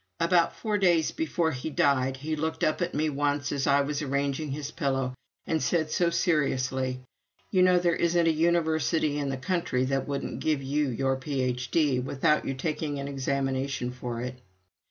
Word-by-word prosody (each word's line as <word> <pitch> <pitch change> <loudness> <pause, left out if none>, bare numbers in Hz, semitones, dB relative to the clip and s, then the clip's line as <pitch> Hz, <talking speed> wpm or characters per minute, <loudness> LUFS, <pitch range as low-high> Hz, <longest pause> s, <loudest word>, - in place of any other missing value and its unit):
About 170 0 +3
four 210 -2 -1
days 175 -5 +3
before 175 - 0
he 130 +3 -4
died, 135 -3 +2
he 155 +4 -3
looked 160 +1 -3
up 155 - +1
at 175 0 -1
me 155 +2 +1
once 145 0 -1
as 140 -1 -1
I 140 0 +4
was 145 +1 -2
arranging 140 +1 -1
his 145 +1 -4
pillow 135 -3 -1 0.3
and 160 -1 0
said, 160 -3 0
so 175 -1 +2
seriously, 130 -6 0 0.5
"You 185 - +3
know, 180 0 +5
there 175 -1 +2
isn't 170 0 +2
a - - +5
university 160 -2 +1
in 140 -1 -1
the 135 - -2
country 150 -5 0
that 135 0 -1
wouldn't 140 -1 -3
give 150 -3 0
you 145 +1 0
your 135 +2 0
Ph.D. 130 +1 0
without 135 +4 +1
your 135 - -2
taking 150 +1 -2
an 140 0 -4
examination 135 -2 -1
for 125 -2 -5
it." 125 0 -5
145 Hz, 175 wpm, -27 LUFS, 135-160 Hz, 0.5 s, know